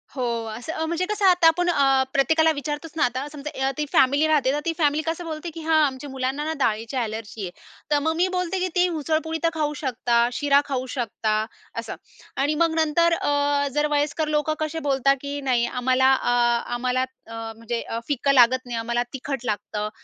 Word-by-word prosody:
हो. 255 Hz, -, -2 dB, 0.3 s
असं 245 Hz, +8 st, -6 dB
अ, 320 Hz, -, -2 dB
म्हणजे 340 Hz, +2 st, -1 dB
कसं 420 Hz, -1 st, 0 dB
आता 360 Hz, -3 st, +6 dB
आपण 355 Hz, +2 st, +3 dB
अ, 270 Hz, -4 st, +3 dB
प्रत्येकाला 320 Hz, +3 st, +3 dB
विचारतोचना 295 Hz, +2 st, -3 dB
आता 255 Hz, +3 st, -1 dB
समजा 280 Hz, -2 st, -3 dB
ती 300 Hz, -, -1 dB
फॅमिली 280 Hz, +4 st, +4 dB
राहते 290 Hz, -4 st, +3 dB
तर, 295 Hz, -, 0 dB
ती 335 Hz, -, 0 dB
फॅमिली 300 Hz, -1 st, +2 dB
कसं 335 Hz, +2 st, -3 dB
बोलते, 320 Hz, +1 st, -5 dB
की 330 Hz, -, -7 dB
हां 315 Hz, 0 st, +3 dB
आमच्या 270 Hz, +1 st, -4 dB
मुलांनाना 270 Hz, +4 st, -2 dB
डाळीची 225 Hz, 0 st, -1 dB
एलर्जी 220 Hz, -2 st, -4 dB
आहे. 180 Hz, -, -4 dB, 0.4 s
तर, 295 Hz, -, +4 dB
मग 320 Hz, +2 st, 0 dB
मी 355 Hz, +3 st, +2 dB
बोलते, 365 Hz, +1 st, -1 dB
की 370 Hz, -, 0 dB
ते 360 Hz, 0 st, +4 dB
उसळपोळी 320 Hz, +2 st, -1 dB
तर 330 Hz, -, +4 dB
खाऊ 300 Hz, -2 st, -1 dB
शकता, 245 Hz, -3 st, 0 dB, 0.2 s
शिरा 280 Hz, +1 st, +3 dB
खाऊ 260 Hz, -3 st, -2 dB
शकता 220 Hz, -3 st, -1 dB, 0.4 s
असं -, -, -6 dB, 0.4 s
आणि 290 Hz, +3 st, +1 dB
मग, 330 Hz, +1 st, +2 dB
नंतर 330 Hz, +1 st, +3 dB
अ, 285 Hz, -2 st, +1 dB
जर 295 Hz, +1 st, +2 dB
वयस्कर 295 Hz, +1 st, 0 dB
लोकं 305 Hz, 0 st, +1 dB
कसे 310 Hz, +1 st, -2 dB
बोलता, 275 Hz, 0 st, +3 dB
की 285 Hz, 0 st, -4 dB
नाही 250 Hz, -3 st, +1 dB
आम्हाला, 255 Hz, +1 st, +1 dB
आ, 245 Hz, -2 st, +3 dB
आम्हाला 250 Hz, +1 st, 0 dB, 0.3 s
अ, 230 Hz, -, -10 dB, 0.2 s
म्हणजे 230 Hz, +1 st, -4 dB
अ, 230 Hz, -, -4 dB
फिकं 280 Hz, -1 st, +1 dB
लागत 255 Hz, 0 st, +5 dB
नाही, 240 Hz, -1 st, -4 dB
आम्हाला 235 Hz, +1 st, -1 dB
तिखट 270 Hz, -1 st, -4 dB
लागतं. 210 Hz, 0 st, -3 dB
285 Hz, 190 wpm, -24 LUFS, 255-315 Hz, 0.4 s, आता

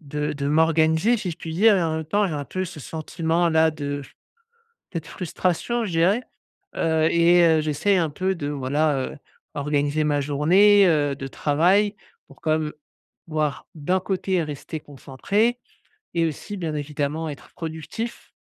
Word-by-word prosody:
de 150 Hz, 0 st, -3 dB
de 140 Hz, -1 st, -3 dB
m'organiser 160 Hz, +7 st, +3 dB
si 190 Hz, -4 st, -3 dB
je 160 Hz, -, -7 dB
puis 160 Hz, -1 st, -6 dB
dire 210 Hz, +4 st, +5 dB
et 180 Hz, -, +1 dB
en 160 Hz, -1 st, 0 dB
même 160 Hz, -, -3 dB
temps 205 Hz, +6 st, +1 dB
j'ai 170 Hz, -, -3 dB
un 145 Hz, -1 st, -3 dB
peu 185 Hz, +7 st, -3 dB
ce 170 Hz, -4 st, -8 dB
sentiment 165 Hz, +3 st, -1 dB
là 160 Hz, 0 st, +4 dB
de 145 Hz, -2 st, -4 dB, 0.9 s
cette 165 Hz, -4 st, -4 dB
frustration 185 Hz, +7 st, -2 dB
je 205 Hz, -, -3 dB
dirais. 180 Hz, +8 st, +2 dB, 0.5 s
Heu, 160 Hz, -1 st, +2 dB
et 170 Hz, +1 st, +5 dB
heu, 160 Hz, -1 st, +4 dB
j'essaie 155 Hz, +6 st, +1 dB
un 165 Hz, -3 st, +1 dB
peu 185 Hz, +6 st, -1 dB
de 150 Hz, -5 st, -4 dB
voilà, 145 Hz, +1 st, 0 dB
heu, -, -, -11 dB, 0.4 s
organiser 145 Hz, +1 st, 0 dB
ma 145 Hz, -1 st, +1 dB
journée, 185 Hz, +9 st, +5 dB
heu, 145 Hz, -4 st, +2 dB
de 135 Hz, 0 st, -6 dB
travail 180 Hz, +10 st, +2 dB, 0.3 s
pour 140 Hz, -, -19 dB
comme 155 Hz, -1 st, 0 dB, 0.5 s
voir 155 Hz, -2 st, -2 dB
d'un 180 Hz, +5 st, 0 dB
côté 185 Hz, -2 st, -1 dB
rester 150 Hz, +2 st, -6 dB
concentré 150 Hz, -, -1 dB, 0.6 s
et 165 Hz, -1 st, +2 dB
aussi 165 Hz, +6 st, -5 dB
bien 165 Hz, -4 st, -3 dB
évidemment 150 Hz, +2 st, -3 dB
être 145 Hz, -4 st, -9 dB
productif 165 Hz, +8 st, -6 dB
160 Hz, 165 wpm, -23 LUFS, 150-180 Hz, 0.9 s, dire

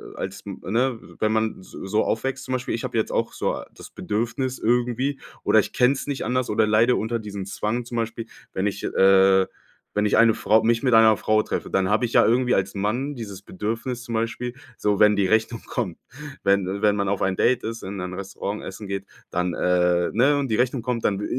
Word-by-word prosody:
als -, -, -5 dB
ne, 120 Hz, +4 st, -1 dB, 0.2 s
wenn 110 Hz, 0 st, +1 dB
man 110 Hz, -2 st, -1 dB
so 95 Hz, -, -10 dB
so 105 Hz, +3 st, +1 dB
aufwächst. 130 Hz, +4 st, -2 dB
Zum 130 Hz, -, -4 dB
Beispiel, 130 Hz, 0 st, -2 dB
ich 115 Hz, -, -3 dB
habe -, -, -3 dB
jetzt 110 Hz, -, 0 dB
auch -, -, -1 dB
so -, -, -2 dB
das -, -, -13 dB
Bedürfnis 120 Hz, +4 st, -2 dB
irgendwie 125 Hz, +4 st, 0 dB, 0.2 s
oder -, -, +5 dB
ich -, -, -2 dB
kenn's 135 Hz, +3 st, +2 dB
nicht 140 Hz, -2 st, -3 dB
anders 125 Hz, +2 st, 0 dB
oder 110 Hz, +1 st, +3 dB
leide 110 Hz, +3 st, +4 dB
unter 115 Hz, +2 st, -1 dB
diesem 100 Hz, -3 st, -6 dB
Zwang 110 Hz, +4 st, -2 dB
zum 120 Hz, 0 st, -5 dB
Beispiel, 115 Hz, 0 st, -3 dB, 0.3 s
wenn 95 Hz, -, -1 dB
ich, 100 Hz, -1 st, -2 dB
äh 95 Hz, 0 st, +5 dB, 0.5 s
wenn 105 Hz, 0 st, +2 dB
ich -, -, +2 dB
eine 115 Hz, -1 st, +6 dB
Frau 110 Hz, 0 st, +3 dB
mich 115 Hz, 0 st, +2 dB
mit 125 Hz, -4 st, +3 dB
einer 110 Hz, -1 st, +6 dB
Frau 110 Hz, 0 st, +2 dB
treffe, -, -, -4 dB
dann 95 Hz, -1 st, +1 dB
habe 110 Hz, +4 st, +2 dB
ich 115 Hz, -, -5 dB
ja -, -, +6 dB
irgendwie 125 Hz, +2 st, +3 dB
als 95 Hz, 0 st, 0 dB
Mann 120 Hz, +8 st, -1 dB
dieses 100 Hz, -6 st, -8 dB
Bedürfnis 115 Hz, +6 st, -4 dB
zum 120 Hz, -2 st, -5 dB
Beispiel, 120 Hz, +2 st, -2 dB, 0.2 s
so 105 Hz, -1 st, 0 dB
wenn 105 Hz, 0 st, +6 dB
die 100 Hz, -2 st, +2 dB
Rechnung 110 Hz, +3 st, +1 dB
kommt 100 Hz, -9 st, -3 dB, 0.4 s
wenn 100 Hz, 0 st, +1 dB
wenn 105 Hz, -1 st, +3 dB
man 100 Hz, -1 st, -1 dB
auf 100 Hz, -1 st, -1 dB
ein 95 Hz, 0 st, +1 dB
Date 125 Hz, +4 st, +2 dB
ist, 115 Hz, +1 st, -5 dB
in 95 Hz, 0 st, -5 dB
ein 90 Hz, 0 st, -5 dB
Restaurant 100 Hz, +2 st, -5 dB
essen 100 Hz, +2 st, -8 dB
geht, 100 Hz, 0 st, -4 dB, 0.2 s
dann 90 Hz, 0 st, -1 dB
äh, 90 Hz, -1 st, +2 dB
ne, 135 Hz, +6 st, +3 dB
und 140 Hz, -, -1 dB
die 110 Hz, -, 0 dB
Rechnung 125 Hz, +1 st, +1 dB
kommt, 120 Hz, -1 st, -2 dB
dann, 100 Hz, -1 st, +1 dB
äh, -, -, -2 dB
110 Hz, 220 wpm, -24 LUFS, 100-120 Hz, 0.5 s, eine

